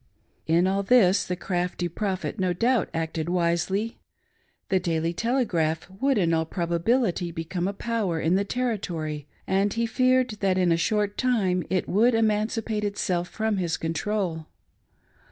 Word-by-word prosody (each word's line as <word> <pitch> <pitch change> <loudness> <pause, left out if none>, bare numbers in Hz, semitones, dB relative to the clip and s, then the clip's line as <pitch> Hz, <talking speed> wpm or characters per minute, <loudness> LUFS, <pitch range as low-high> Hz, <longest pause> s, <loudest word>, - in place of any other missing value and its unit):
In 170 +3 +3
all 195 +1 +1
this 200 -3 +4
the 180 - -2
crafty 180 -1 -2
Prophet 190 +3 -3
no 185 -1 +1
doubt 235 +3 +1
acted 160 0 -3
wisely. 180 +5 0 0.7
The 190 - +3
Daily 165 -2 -1
Telegraph 175 -8 0
would 275 -2 +2
in 170 -4 +2
all 160 0 +2
probability 175 +2 0
become 170 +2 -3
a 200 - -2
power 205 -6 -1
in 160 +2 +1
the 195 +2 +3
Territory, 175 - -3 0.2
and 195 +2 +1
he 230 0 0
feared 255 +1 +2
that 190 -2 +1
in 180 -2 +3
a - - +5
short 205 +4 0
time 200 -9 +1
it 185 -1 0
would 225 +5 +3
emancipate 220 0 0
itself 185 -4 -1
from 220 -2 -1
his 175 -3 -1
control. 165 0 -2
190 Hz, 150 wpm, -26 LUFS, 170-220 Hz, 0.7 s, a